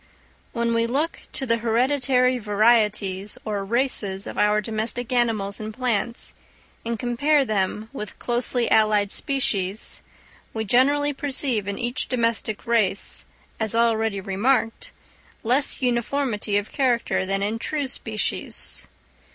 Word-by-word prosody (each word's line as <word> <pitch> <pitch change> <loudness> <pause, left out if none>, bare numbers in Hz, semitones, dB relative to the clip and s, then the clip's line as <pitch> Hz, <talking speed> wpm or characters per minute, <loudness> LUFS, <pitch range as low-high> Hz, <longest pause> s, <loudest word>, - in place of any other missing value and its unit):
_ - - -32 0.5
When 235 -1 0
we 230 0 +2
look 290 +7 -1
to 270 - -2
the 230 -2 +2
hereditary 255 +2 +2
varieties 210 -2 +2
or 205 -2 -2
races 205 -4 -1
of - - -7
our 210 0 +3
domestic 225 +3 -2
animals 220 -5 0
and 215 0 -5
plants, 235 -1 -1 0.5
and 230 0 -2
compare 275 +5 +2
them 210 0 -1
with 210 -7 -7
closely 240 0 0
allied 210 -2 +3
species, 215 -7 0 0.5
we 220 0 -1
generally 285 +6 +3
perceive 265 -7 -1
in 200 - -3
each 245 +1 0
domestic 230 -3 0
race, 220 -5 +1 0.3
as 220 0 -1
already 225 -3 +2
remarked, 225 - 0 0.5
less 260 +4 +1
uniformity 240 -3 0
of 205 +1 -3
character 245 -8 +1
than 195 +1 0
in 215 +3 -1
true 295 +3 -2
species. 225 -4 -2
230 Hz, 125 wpm, -24 LUFS, 210-250 Hz, 0.5 s, our